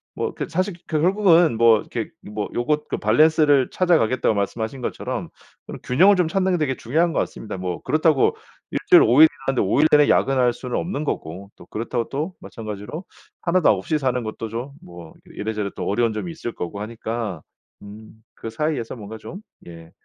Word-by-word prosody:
뭐 -, -, -3 dB
그 -, -, -5 dB
사실 185 Hz, +2 st, -1 dB
그 155 Hz, -2 st, 0 dB
결국은 175 Hz, -, +4 dB
뭐 115 Hz, -1 st, +5 dB
이렇게 115 Hz, -3 st, -5 dB
뭐 105 Hz, 0 st, -5 dB
요거 150 Hz, +5 st, 0 dB
그 -, -, -2 dB
밸런스를 150 Hz, -4 st, +3 dB
찾아가겠다고 130 Hz, -11 st, +2 dB
말씀하신 110 Hz, +5 st, -3 dB
것처럼 -, -, -4 dB, 0.4 s
그런 -, -, -8 dB
균형을 185 Hz, +11 st, +5 dB
좀 180 Hz, -3 st, +2 dB
찾는 190 Hz, +2 st, 0 dB
게 -, -, +2 dB
되게 145 Hz, -5 st, -1 dB
중요한 160 Hz, +8 st, 0 dB
것 -, -, 0 dB
같습니다. 105 Hz, -, -5 dB
뭐 90 Hz, -2 st, -4 dB
그렇다고 155 Hz, -3 st, +2 dB, 0.4 s
1 -, -, -1 dB
주일 -, -, +9 dB
5 125 Hz, +6 st, +5 dB
일 160 Hz, -, +10 dB, 0.2 s
일하는데 135 Hz, -2 st, +1 dB
5 100 Hz, -, +1 dB
일 155 Hz, -, +5 dB
내내 150 Hz, -1 st, +5 dB
야근할 130 Hz, -3 st, +3 dB
수는 125 Hz, +1 st, -4 dB
없는 160 Hz, -4 st, -3 dB
거고 95 Hz, -, -5 dB
또 -, -, -14 dB
그렇다고 115 Hz, +2 st, -3 dB
또 155 Hz, +7 st, -4 dB
마찬가지로 110 Hz, -, -7 dB, 0.4 s
1 185 Hz, +1 st, +1 dB
도 -, -, +4 dB
없이 105 Hz, +10 st, +1 dB
사는 130 Hz, -3 st, 0 dB
것도 110 Hz, 0 st, -5 dB
좀 120 Hz, +5 st, -5 dB
뭐 85 Hz, -2 st, -12 dB, 0.2 s
이래저래 105 Hz, -1 st, -3 dB
또 -, -, -4 dB
어려운 115 Hz, +2 st, +1 dB
점이 170 Hz, +11 st, -4 dB
있을 160 Hz, -7 st, -6 dB
거고 95 Hz, +4 st, -6 dB
하니까 110 Hz, -4 st, -5 dB, 0.4 s
음 110 Hz, +2 st, -13 dB
그 115 Hz, -, -7 dB
사이에서 145 Hz, -2 st, -2 dB
뭔가 110 Hz, -1 st, -9 dB
좀 185 Hz, -, -10 dB, 0.3 s
예 85 Hz, -1 st, -12 dB
120 Hz, 370 characters per minute, -22 LUFS, 110-155 Hz, 0.4 s, 일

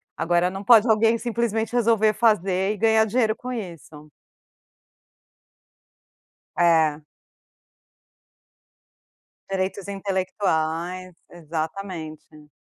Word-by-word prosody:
Agora, 175 Hz, +1 st, +1 dB
não 195 Hz, +1 st, -7 dB
pode 230 Hz, +1 st, +6 dB
alguém, 225 Hz, +1 st, +3 dB
simplesmente, 230 Hz, -1 st, -2 dB
resolver 225 Hz, -2 st, +2 dB
fazer 195 Hz, -3 st, +1 dB
e -, -, -8 dB
ganhar 220 Hz, 0 st, +3 dB
dinheiro 220 Hz, 0 st, 0 dB
com 250 Hz, -, -7 dB
isso. 165 Hz, -, -9 dB, 2.5 s
É. 160 Hz, -3 st, +3 dB, 2.5 s
Direitos 195 Hz, 0 st, -3 dB
intelectuais. 185 Hz, -3 st, -2 dB, 0.2 s
Exatamente. 160 Hz, -2 st, -7 dB
195 Hz, 75 wpm, -23 LUFS, 170-220 Hz, 2.5 s, pode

